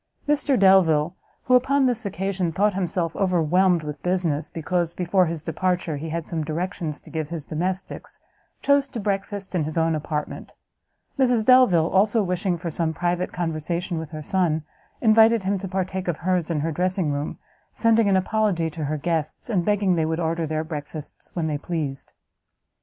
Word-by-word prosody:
Mr 290 -2 +2
Delvile, 175 -4 +4 0.3
who, 255 - +1
upon 270 +2 +4
this 240 -4 0
occasion, 190 -2 -2
thought 205 +5 +2
himself 175 -3 -2
overwhelmed 180 -1 +2
with 150 -2 -6
business, 175 -4 -1
because, 170 +1 -2
before 180 0 +2
his 160 -2 -4
departure, 175 -1 -1
he 160 +3 -5
had 165 0 -3
some 160 -2 -3
directions 160 0 -3
to - - -16
give 160 -2 -3
to 170 - -8
his 155 -3 -6
domestics, 185 +4 -4 0.4
chose 280 -1 +3
to 240 - -6
breakfast 200 -1 -3
in 175 -4 +1
his 155 +2 -4
own 165 0 +2
apartment; 150 -1 -4 0.7
Mrs 245 -4 +3
Delvile, 250 -11 +6
also, 205 +5 +3
wishing 180 -1 -1
for 170 0 -5
some 160 +1 -1
private 175 +1 -1
conversation 170 +1 -2
with 160 -2 -6
her 155 -1 -7
son, 165 -3 +1 0.4
invited 225 -1 +5
him 195 +1 0
to 195 - -5
partake 185 0 -3
of 170 -3 -1
hers 180 -2 0
in 155 -3 0
her 165 +2 -1
dressing 180 -1 0
room, 145 +1 -3 0.3
sending 225 -1 +3
an 190 - +4
apology 190 -4 0
to 155 -1 -4
her 155 +2 -2
guests, 160 +6 -3
and 185 -5 +1
begging 205 -1 +2
they 160 -2 +1
would 160 +1 -1
order 165 -1 -1
their 155 +1 -1
breakfasts 150 -1 -8
when 170 -3 -1
they 150 -2 -1
pleased. 150 -5 -4
175 Hz, 180 wpm, -24 LUFS, 160-195 Hz, 0.7 s, Delvile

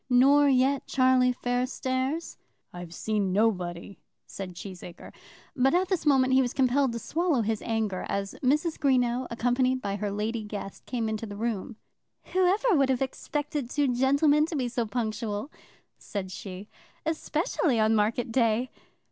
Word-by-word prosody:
"Nor 280 +3 +5
yet 265 +1 +2
Charlie 255 -1 +4
Fairstairs?" 260 +4 -2 0.4
"I've 175 -1 -8
seen 205 +1 -1
nobody," 185 -3 -1 0.3
said 185 -2 -7
Cheesacre. 180 0 -10 0.4
But 265 +4 +3
at 370 +1 +1
this 355 -5 -1
moment 260 -2 +4
he 265 - +6
was 245 -1 -1
compelled 265 0 +2
to - - -3
swallow 320 +1 0
his 220 0 -1
anger, 220 -5 -2
as 195 0 -2
Mrs. 300 +5 +1
Greenow, 255 -3 +2
accompanied 250 +2 +1
by 200 -4 -3
her 205 0 -2
lady 215 +3 -2
guest, 205 -2 -7
came 235 -3 -2
into 220 +1 -3
the 205 0 -8
room. 225 0 -3 0.6
"Whoever 380 +6 +3
would 275 -3 +3
have 260 0 +2
expected 290 0 -4
two 285 0 +1
gentlemen 280 +4 +3
to 330 - -5
be 260 -4 0
so 235 -1 -2
punctual," 220 +1 -3 0.5
said 190 -3 -5
she, 190 +1 -8 0.4
"especially 315 -4 0
on 220 +1 +3
market 225 +2 +1
day!" 235 +1 +1
245 Hz, 150 wpm, -27 LUFS, 215-275 Hz, 0.6 s, he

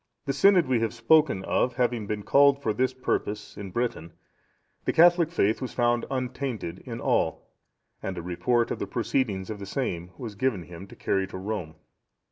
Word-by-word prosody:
The 140 - 0
synod 185 +3 +5
we 130 -2 +2
have 115 +1 -1
spoken 115 -4 +3
of 125 -1 +1
having 120 -4 0
been 105 0 -3
called 140 +2 +5
for 110 -6 -1
this 130 +4 +1
purpose 130 -4 -3
in 100 -1 -7
Britain, 95 -6 -3 0.7
the - - +1
Catholic 170 0 +6
faith 110 - +1
was 130 - -5
found 120 -1 +1
untainted 125 -8 -3
in 120 -3 -7
all, - - 0 0.5
and 95 -1 -4
a 85 - -5
report 115 +7 0
of - - -3
the 100 - -3
proceedings 110 -3 -1
of 105 - -6
the 100 - -7
same 90 -8 -3
was 115 -4 -6
given 105 -4 -1
him 90 +3 -10
to - - -13
carry 95 -1 0
to 95 - -8
Rome. 95 -5 -4
115 Hz, 185 wpm, -27 LUFS, 95-130 Hz, 0.7 s, Catholic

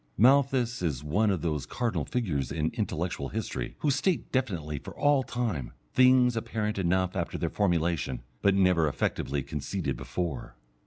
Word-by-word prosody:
Malthus 125 -1 +4
is 75 -6 -1
one 100 +9 +2
of 95 -4 0
those 75 -4 -1
cardinal 120 -2 -1
figures 90 - -1
in 80 0 -1
intellectual 90 -6 -2
history - - -4
who 150 - +2
state 155 +5 0
definitely 85 - -1
for - - -10
all 145 -2 +4
time, 115 - -3 0.2
things 125 -1 +5
apparent 105 -2 -2
enough 95 0 +1
after 85 -3 -2
their 85 - -2
formulation, 85 - 0 0.2
but 100 -1 +4
never 90 -4 +4
effectively 70 -1 -1
conceded 75 0 -3
before. 85 +3 -4
95 Hz, 150 wpm, -28 LUFS, 75-120 Hz, 0.2 s, things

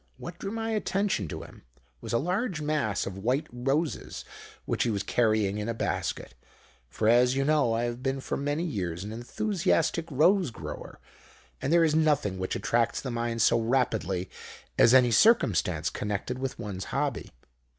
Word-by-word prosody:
What 175 0 -8
drew 195 - -4
my 225 +1 -3
attention 200 - 0
to - - -6
him - - -14 0.4
was - - -6
a 115 - +3
large 180 - -1
mass 150 -9 -1
of 95 0 -6
white 125 +8 0
roses 135 +6 -2 0.4
which - - -1
he 120 - +2
was 100 -3 -1
carrying 110 -3 +1
in 105 +2 -3
a 115 - -2
basket; - - -3 0.6
for, 110 - -1
as 125 +2 +5
you 135 0 +1
know, 145 -6 +3
I 115 - 0
have 120 +1 -3
been 135 +1 -1
for - - -3
many 145 +3 -1
years 90 - -3
an 105 - -6
enthusiastic 170 - 0
rose 175 +5 +3
grower, 115 - -8 0.6
and 135 - -1
there 170 0 +5
is 155 -2 +3
nothing 150 -12 +2
which 95 - -2
attracts 115 0 +1
the 130 - -5
mind 115 -1 -1
so - - +4
rapidly 110 -6 0 0.5
as 120 - +6
any 125 -2 +6
circumstance 115 - +3
connected 105 +5 -3
with 135 0 -3
one's 100 -5 -5
hobby. 140 -3 -2
125 Hz, 170 wpm, -28 LUFS, 110-155 Hz, 0.6 s, as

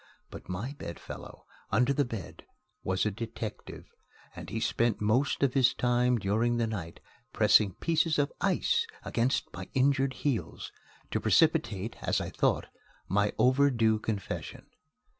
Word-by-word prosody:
But - - -10
my 105 +10 -4
bed 85 - -6
fellow - - -10 0.2
under 125 +6 +3
the 145 - +2
bed 115 -7 -8 0.4
was 95 +2 0
a 105 - +1
detective; 110 0 -7 0.5
and - - -8
he 110 - -3
spent 115 0 +1
most 120 +8 +1
of 135 -3 +2
his 130 -1 +4
time 125 0 +2
during 115 +4 +1
the 115 - +1
night 95 -7 -5 0.3
pressing 100 -4 +4
pieces 165 -1 +1
of 145 -1 +1
ice 460 - +1 0.2
against 125 +3 0
my - - -7
injured 135 0 +2
heels, 135 -6 -3 0.4
to - - 0
precipitate, 100 +4 +2
as - - +1
I - - -4
thought, - - +1 0.4
my 105 +2 +2
overdue 125 -5 +3
confession. 105 -2 -5
120 Hz, 140 wpm, -29 LUFS, 105-135 Hz, 0.5 s, his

